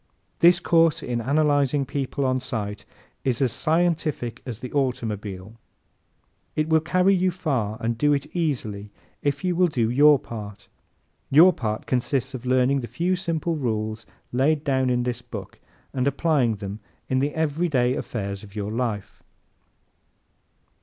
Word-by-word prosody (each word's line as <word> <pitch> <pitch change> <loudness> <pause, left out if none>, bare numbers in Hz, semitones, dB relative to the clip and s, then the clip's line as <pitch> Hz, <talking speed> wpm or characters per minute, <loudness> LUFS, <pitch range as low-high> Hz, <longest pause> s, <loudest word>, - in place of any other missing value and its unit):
This 175 +1 +6
course 165 -2 +3
in 120 -1 -2
Analyzing 145 +1 +2
People 135 +1 -2
on 130 0 +1
Sight 105 -5 -4 0.4
is 125 -3 0
as 130 -4 +1
scientific 160 -7 0
as 120 -4 -4
the 125 +1 -8
automobile. 110 -6 -3 1.0
It 155 0 0
will 160 0 +4
carry 185 +4 +2
you 185 0 +2
far 135 - -2
and 115 0 -2
do 145 0 +3
it 140 -1 +1
easily 115 - -2 0.3
if 140 -1 -1
you 180 -1 +1
will 180 +1 +4
do 120 -8 0
your 145 +3 +6
part. 105 -5 -9 0.6
Your 170 +6 +7
part 110 -6 -3
consists 130 +1 -1
of 130 -1 -6
learning 130 +2 +3
the 120 - -5
few 180 +6 0
simple 170 -2 -2
rules 110 -4 -3 0.2
laid 145 +4 +2
down 130 -3 +1
in 125 -1 +1
this 125 0 -3
book 110 -5 -9 0.3
and 130 0 0
in - - +6
applying 140 -6 +1
them 100 +1 -6 0.3
in 130 - +1
the 145 +2 -1
everyday 150 -5 +1
affairs 100 -6 -4
of 105 -1 -14
your 105 0 -3
life. 115 -4 -3
130 Hz, 155 wpm, -24 LUFS, 115-155 Hz, 1.0 s, Your